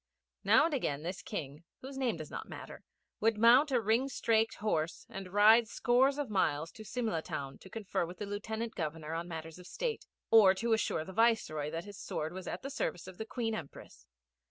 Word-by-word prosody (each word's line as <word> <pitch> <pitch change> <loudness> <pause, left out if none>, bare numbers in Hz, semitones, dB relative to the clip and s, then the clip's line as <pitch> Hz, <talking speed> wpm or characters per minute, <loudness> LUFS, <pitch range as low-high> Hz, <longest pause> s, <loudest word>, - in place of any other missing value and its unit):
Now - - +6
and 330 - -1
again 150 - -1
this 180 +2 -4
King, 145 +2 -6 0.2
whose 265 +1 -8
name 255 -8 0
does 155 -2 -8
not - - -6
matter, - - -9 0.4
would 220 0 +2
mount 240 +7 +6
a 250 - +3
ringstraked 225 0 +1
horse 165 -6 -1
and 190 -1 -7
ride 220 +3 +6
scores 260 +5 +3
of 290 -2 -2
miles 165 -6 0
to 220 - -11
Simla 215 -6 -2
town 135 -3 -6
to 190 - -13
confer 210 -3 -2
with 180 - -9
the 205 - -4
Lieutenant 220 +3 -4
Governor 160 -1 -4
on 165 +1 -3
matters 160 0 -7
of 180 - -12
state, 475 - -3 0.2
or 205 -4 +8
to 230 +3 0
assure 205 -7 0
the 190 - -9
Viceroy 200 -10 +2
that 165 +3 -5
his 200 -1 -10
sword 155 +2 -3
was 185 0 -7
at - - -5
the 275 - -5
service 180 -9 -3
of 185 -1 -11
the 220 - -3
Queen 225 -2 -2
Empress. 140 - -9
205 Hz, 205 wpm, -32 LUFS, 165-230 Hz, 0.4 s, or